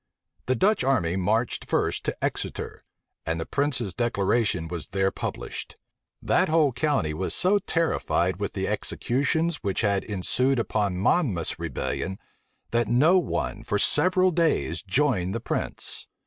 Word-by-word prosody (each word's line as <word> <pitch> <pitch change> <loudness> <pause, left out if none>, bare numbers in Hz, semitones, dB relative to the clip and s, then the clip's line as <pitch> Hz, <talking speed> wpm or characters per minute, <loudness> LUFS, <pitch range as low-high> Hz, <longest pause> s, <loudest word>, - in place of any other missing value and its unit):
The 130 - +2
Dutch 205 - +2
army 110 -11 +1
marched 110 +5 0
first - - 0
to - - -3
Exeter; - - -4 0.4
and 80 +1 -2
the 80 - -3
prince's 130 -9 -1
declaration 100 -6 0
was 85 -2 -6
there 95 +1 0
published. - - -6 0.5
That - - +2
whole 155 -3 +4
county 140 - 0
was 95 +5 -2
so 195 +3 +3
terrified 95 - 0
with 100 0 -3
the 95 -1 -2
executions 155 +6 0
which 100 -3 -2
had 100 -3 +1
ensued 125 +7 0
upon 105 -5 0
Monmouth's 100 - +1
rebellion, 95 0 -3 0.5
that 120 -1 +1
no 150 - +5
one 175 - -3
for - - -1
several 185 0 +3
days 155 - +1
joined 100 -4 +1
the - - -1
prince. - - -3
115 Hz, 140 wpm, -26 LUFS, 95-145 Hz, 0.5 s, no